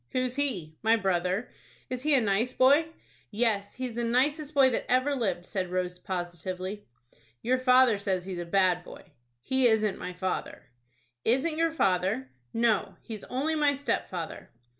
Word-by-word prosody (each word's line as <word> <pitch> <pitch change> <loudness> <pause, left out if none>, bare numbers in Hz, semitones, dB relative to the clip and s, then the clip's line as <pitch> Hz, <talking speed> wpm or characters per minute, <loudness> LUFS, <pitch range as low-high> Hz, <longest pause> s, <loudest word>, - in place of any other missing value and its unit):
"Who's 255 -1 -1
he?" 205 - -1
"My 225 +1 +4
brother." 190 0 -1 0.4
"Is 255 -1 -4
he 300 +1 +5
a 260 - +4
nice 220 +4 +1
boy?" 285 +5 +4 0.4
"Yes, 205 -2 0
he's 255 -2 -4
the 240 +1 -2
nicest 285 +6 0
boy 265 -2 +6
that - - -2
ever 255 +3 +2
lived," 190 -8 -2
said 185 -2 -3
Rose, 180 0 -2
positively. 185 +2 -5 0.6
"Your 255 +2 +2
father 255 -4 +5
says 190 -3 -1
he's 185 -2 -5
a 175 - -4
bad 180 0 +2
boy." - - -12 0.4
"He 260 -1 +3
isn't 215 -3 +1
my 180 - -5
father." 185 +1 -4 0.6
"Isn't 270 +7 +2
your 330 0 +3
father?" 185 - 0 0.2
"No, 230 -3 +1
he's 220 -3 -7
only 280 +5 -1
my 295 -2 +2
stepfather." 185 - -4
220 Hz, 160 wpm, -28 LUFS, 185-255 Hz, 0.6 s, boy